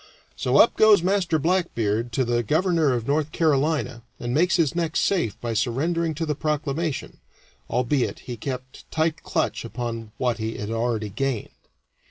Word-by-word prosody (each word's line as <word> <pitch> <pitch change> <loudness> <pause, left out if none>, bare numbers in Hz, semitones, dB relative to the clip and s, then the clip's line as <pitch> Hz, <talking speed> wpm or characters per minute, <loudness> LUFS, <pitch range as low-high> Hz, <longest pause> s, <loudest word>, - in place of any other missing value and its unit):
So - - +1
up - - +6
goes 215 -5 +6
Master 185 -3 +2
Blackbeard 120 - 0
to 130 - +1
the 120 0 +1
Governor 160 - +2
of 120 -2 -2
North 150 +2 0
Carolina 150 -5 +1 0.2
and 120 0 -3
makes 175 +7 +3
his 165 -6 +2
neck 165 -2 -2
safe 170 - +1
by 120 -1 -3
surrendering 155 +9 0
to 165 +3 -2
the 150 - 0
proclamation 150 0 -2 0.5
albeit 125 +2 0
he 125 - -6
kept 130 +2 -7
tight 160 0 0
clutch 160 -4 -1
upon 115 -2 -5
what 125 -3 0
he 110 +1 -3
had 105 +1 -4
already 115 -2 -1
gained. 130 +1 -2
140 Hz, 160 wpm, -24 LUFS, 120-165 Hz, 0.5 s, up